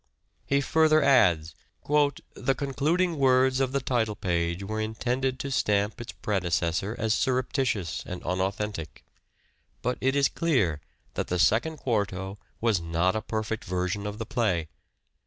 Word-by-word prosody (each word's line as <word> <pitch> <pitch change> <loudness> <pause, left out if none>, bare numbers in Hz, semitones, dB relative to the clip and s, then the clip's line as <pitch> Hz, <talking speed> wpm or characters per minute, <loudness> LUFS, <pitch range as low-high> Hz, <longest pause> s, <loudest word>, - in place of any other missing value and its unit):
He 140 0 +2
further 155 +1 +4
adds: 90 - +4 0.2
" - - -41 0.5
The 135 - 0
concluding 155 +5 0
words 130 0 +4
of 135 -1 +1
the 140 - +1
title 120 -5 0
page 85 0 -1
were 110 +2 -3
intended 125 +4 -1
to 140 - -4
stamp 105 -1 +1
its 120 - -6
predecessor 90 +1 -1
as 110 -1 +1
surreptitious 125 - 0
and 90 - -6
unauthentic. 95 -3 -3 0.8
But 125 +1 -1
it 135 +1 +2
is 140 -1 +4
clear 105 - +1 0.3
that - - -2
the 90 - -1
Second 120 - +2
Quarto 100 -6 -2 0.2
was 110 -6 +2
not 85 +3 +1
a 110 - -1
perfect 110 0 -3
version 90 +3 -2
of 105 0 -5
the 115 - -4
play. 90 -11 0
110 Hz, 145 wpm, -27 LUFS, 95-130 Hz, 0.8 s, further